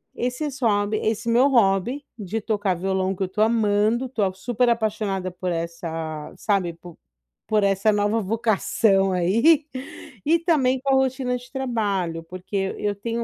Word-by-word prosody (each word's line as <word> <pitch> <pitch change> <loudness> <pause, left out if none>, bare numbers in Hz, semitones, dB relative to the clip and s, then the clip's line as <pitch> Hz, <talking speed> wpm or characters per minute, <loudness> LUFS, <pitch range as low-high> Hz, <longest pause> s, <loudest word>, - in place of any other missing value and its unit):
esses 260 +3 -3
hobby 210 -2 +1
esse 225 +2 -1
meu 245 +4 +5
hobby 235 +2 +2
de 210 +2 -4
tocar 205 -3 0
violão, 190 +1 -1
que 190 - -2
eu - - -1
estou 210 +4 0
amando, 220 +1 +2
estou 215 -7 -1
super 240 +4 0
apaixonada 210 -5 -1
por 180 0 -4
essa, 165 -2 -4
sabe, 190 -5 0
por 170 0 -13 0.5
por 215 -1 +3
essa 200 +2 +2
nova 205 +2 +1
vocação, 205 -2 +2
aí, 230 - +3 0.6
e 330 +3 +4
também 275 -7 +2
com 275 -1 +2
a - - +5
rotina 260 -1 0
de 245 +1 -14
trabalho, 205 - -1
porque 190 +3 -4
e - - -5
eu 205 - +1
tenho 230 +3 -3
210 Hz, 160 wpm, -23 LUFS, 190-240 Hz, 0.6 s, meu